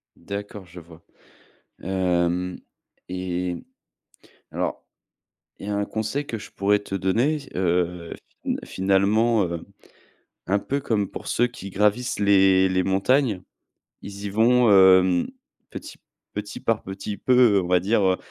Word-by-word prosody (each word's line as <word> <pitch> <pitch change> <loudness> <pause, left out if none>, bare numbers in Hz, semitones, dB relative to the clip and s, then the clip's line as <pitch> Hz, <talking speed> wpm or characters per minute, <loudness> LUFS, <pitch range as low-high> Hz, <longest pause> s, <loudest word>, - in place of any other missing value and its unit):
D'accord 100 -1 -7
je 90 +1 -12
vois. 85 0 -16 0.8
Hem, 90 -1 0 0.5
et 90 -1 -3 1.0
alors - - -3 0.8
il 100 - -8
y - - -3
a 105 - -1
un 100 0 0
conseil 110 +8 -3
que 115 - -5
je 105 - -11
pourrais 100 +1 +2
te 100 -1 -6
donner, 115 - +1 0.2
heu, 90 -1 -1 0.3
fina - - -1
finalement, 100 +4 +2
heu, 85 -1 -5 0.8
un 100 +2 +2
peu 140 +6 -2
comme 110 -7 -1
pour - - -8
ceux 120 - +2
qui 120 -5 -9
gravissent 105 +6 0
les 95 -2 +4
les 95 0 +1
montagnes, 100 +2 +1 0.6
ils 100 0 -8
y 100 - -2
vont, 120 +3 +4
hem, 95 -2 +5 0.4
petit - - -9 0.4
petit 105 +1 -6
par 115 -2 -1
petit 100 +2 -6
peu, 125 -6 +4
on 90 - -4
va 90 0 +3
dire, 105 +3 +1
heu, 95 -1 +3
100 Hz, 140 wpm, -24 LUFS, 90-110 Hz, 1.0 s, hem